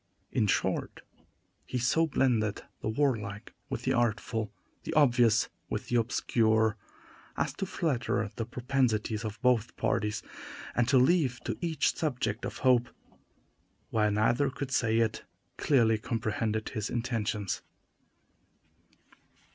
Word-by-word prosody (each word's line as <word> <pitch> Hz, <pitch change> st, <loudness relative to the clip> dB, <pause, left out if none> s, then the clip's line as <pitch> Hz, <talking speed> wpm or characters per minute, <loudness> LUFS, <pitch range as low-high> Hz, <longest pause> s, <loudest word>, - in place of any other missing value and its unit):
In 105 Hz, -, +1 dB
short, -, -, -1 dB, 0.6 s
he 125 Hz, -, -4 dB
so 135 Hz, +7 st, +2 dB
blended 115 Hz, -8 st, +1 dB, 0.2 s
the -, -, -2 dB
warlike 110 Hz, -5 st, -1 dB, 0.2 s
with 125 Hz, -3 st, -4 dB
the 130 Hz, -, +1 dB
artful, 110 Hz, -2 st, 0 dB, 0.3 s
the -, -, -5 dB
obvious 120 Hz, -7 st, +4 dB, 0.2 s
with -, -, -4 dB
the 120 Hz, -, +2 dB
obscure, 110 Hz, -3 st, +2 dB, 0.6 s
as -, -, 0 dB
to 195 Hz, -, -4 dB
flatter 125 Hz, -, 0 dB
the 115 Hz, -, -3 dB
propensities 120 Hz, -4 st, 0 dB
of 110 Hz, 0 st, -5 dB
both 125 Hz, -3 st, +2 dB
parties, 105 Hz, -2 st, 0 dB, 0.5 s
and 120 Hz, -1 st, +2 dB
to 130 Hz, +1 st, +4 dB
leave 130 Hz, -2 st, +3 dB
to -, -, -2 dB
each 165 Hz, -4 st, +1 dB
subject 125 Hz, -8 st, -2 dB
of -, -, -5 dB
hope, 120 Hz, -2 st, +4 dB, 1.0 s
while 105 Hz, -2 st, +2 dB
neither 115 Hz, +6 st, +2 dB
could 135 Hz, 0 st, -5 dB
say 115 Hz, -3 st, +2 dB
it 110 Hz, -1 st, 0 dB, 0.3 s
clearly 115 Hz, -6 st, +3 dB
comprehended 110 Hz, -1 st, -2 dB
his 110 Hz, -2 st, -3 dB
intentions. 115 Hz, -5 st, -2 dB
115 Hz, 125 wpm, -30 LUFS, 110-130 Hz, 1.0 s, obvious